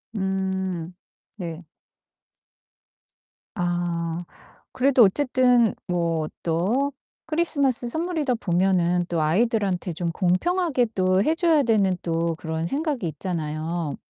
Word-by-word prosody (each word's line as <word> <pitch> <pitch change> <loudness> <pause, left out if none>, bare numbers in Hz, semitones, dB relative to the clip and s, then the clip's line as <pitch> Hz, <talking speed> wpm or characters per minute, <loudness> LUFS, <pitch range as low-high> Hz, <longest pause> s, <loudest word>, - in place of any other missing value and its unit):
음. 190 -3 -2 0.4
네. 170 -2 -6 1.9
아 175 -1 -2 0.5
그래도 255 -2 +4
어쨌든 250 0 +3
뭐 170 -3 -1 0.2
또 200 +13 0 0.3
크리스마스 285 -7 +2
선물이다 315 -3 0
보면은 180 -2 +1
또 170 -3 -1
아이들한테 190 +1 +1
좀 170 +1 -2
공평하게 255 - +1
또 185 0 +2
해 315 +6 +2
줘야 325 -4 +3
되는 200 -5 +2
또 165 -1 -1
그런 160 0 -4
생각이 280 - -2
있잖아요. 160 -1 -3
185 Hz, 215 characters per minute, -24 LUFS, 170-250 Hz, 1.9 s, 그래도